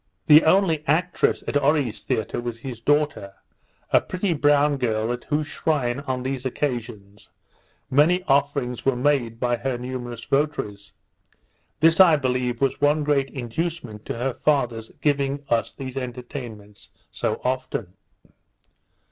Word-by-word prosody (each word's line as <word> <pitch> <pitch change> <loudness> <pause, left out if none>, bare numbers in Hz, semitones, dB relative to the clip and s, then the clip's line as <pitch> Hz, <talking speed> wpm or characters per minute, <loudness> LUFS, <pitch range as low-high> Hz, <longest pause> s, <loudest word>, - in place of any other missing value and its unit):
The 150 +1 +8
only 165 -3 +3
actress 170 +4 +1
at - - -2
Oree's 140 -5 +1
theatre 110 +2 -2
was 120 -1 -6
his 120 -3 -7
daughter, 145 -8 0 0.6
a - - +5
pretty 185 0 -2
brown 145 -1 +3
girl, 110 -2 0
at 120 - -7
whose 150 0 0
shrine, 140 -5 -1
on 130 -1 -2
these 130 -1 -3
occasions, 115 -6 -4 0.6
many 165 +7 +3
offerings 140 -4 0
were 135 -1 +2
made 125 -4 0
by 120 -1 +1
her 130 0 -2
numerous 120 -2 -6
votaries. 120 -9 -2 0.9
This, 165 +2 +5
I 175 -4 +8
believe, 125 -3 -1
was 135 0 0
one 145 +1 +3
great 140 -2 +1
inducement 125 -2 -4
to - - -4
her 125 +2 -2
father's 120 -7 0
giving 140 -1 0
us 115 -2 +1
these 130 -1 -8
entertainments 120 -5 -7 0.2
so - - -2
often. 125 -7 -3
130 Hz, 135 wpm, -23 LUFS, 120-145 Hz, 0.9 s, The